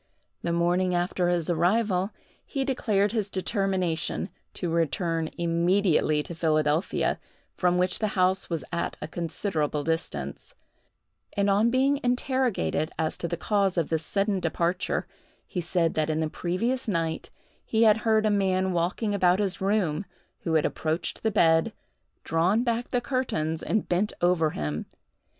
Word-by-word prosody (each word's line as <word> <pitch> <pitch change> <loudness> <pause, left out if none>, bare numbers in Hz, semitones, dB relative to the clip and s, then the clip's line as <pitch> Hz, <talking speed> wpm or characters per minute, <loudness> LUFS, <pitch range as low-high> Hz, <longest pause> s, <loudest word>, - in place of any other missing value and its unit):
The 170 - -1
morning 175 +2 +1
after 175 0 0
his 175 -2 +1
arrival, 185 +3 +2 0.3
he 270 -2 -2
declared 210 -6 +1
his 215 -3 -1
determination 190 -3 -1 0.3
to 175 -3 -2
return 165 0 0
immediately 170 -2 +2
to 170 - -6
Philadelphia, 155 0 +1 0.3
from 180 -1 +1
which 180 0 +1
the 215 - +1
house 185 +1 +2
was 165 -5 -2
at 170 - -2
a - - -5
considerable 160 -3 -2
distance; 165 - -3 0.8
and, 200 -1 +2
on 210 +4 +4
being 270 +3 +2
interrogated 245 - 0
as 155 - 0
to 170 - -2
the 170 0 -3
cause 195 0 +1
of 165 - +1
this 160 -1 0
sudden 200 +3 0
departure, 170 +1 -1 0.4
he 180 - -3
said 170 -1 0
that 155 0 0
in 155 0 0
the 155 -1 -1
previous 230 +10 -1
night 165 -5 -1 0.3
he 225 0 +2
had 215 -1 +6
heard 220 -1 +2
a 215 - +3
man 190 -2 +1
walking 180 +5 0
about 180 -2 +3
his 195 -2 -1
room, 195 -3 +1 0.3
who 165 -2 -1
had 155 - +3
approached 160 +2 -2
the 220 - +1
bed, 165 -6 +3 0.5
drawn 180 +8 +2
back 235 0 -1
the 245 - 0
curtains, 165 - -1
and 215 - -1
bent 185 +4 0
over 175 -3 +3
him. 75 - -4
180 Hz, 150 wpm, -27 LUFS, 165-205 Hz, 0.8 s, had